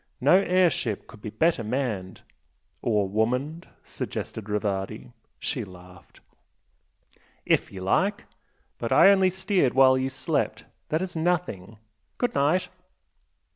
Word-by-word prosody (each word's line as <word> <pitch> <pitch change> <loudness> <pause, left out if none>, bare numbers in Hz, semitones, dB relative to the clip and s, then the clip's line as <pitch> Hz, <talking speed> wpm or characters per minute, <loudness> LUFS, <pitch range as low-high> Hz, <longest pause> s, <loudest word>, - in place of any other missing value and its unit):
No 145 +8 +5
air 185 -2 +3
ship 110 -6 -3
could 110 -3 -15
be 105 - -5
better 160 +1 +1
manned!" 110 -6 -3 0.6
"Or 105 -4 +1
woman'd?" 125 - -1 0.2
suggested 110 -2 -6
Rivardi. 105 +2 -3 0.3
She 125 -5 -3
laughed. 90 -2 -15 1.2
"IF - - +1
you 95 - -8
like! 195 - +1 0.5
But - - -3
I 195 - +7
only 190 -1 +4
steered 190 - 0
while 130 0 +6
you 130 +1 -1
slept. 130 - -2 0.2
That 160 +4 0
is 185 -2 -6
nothing! 160 - -2 0.4
Good 245 - 0
night!" 150 +6 +1
130 Hz, 125 wpm, -26 LUFS, 105-175 Hz, 1.2 s, I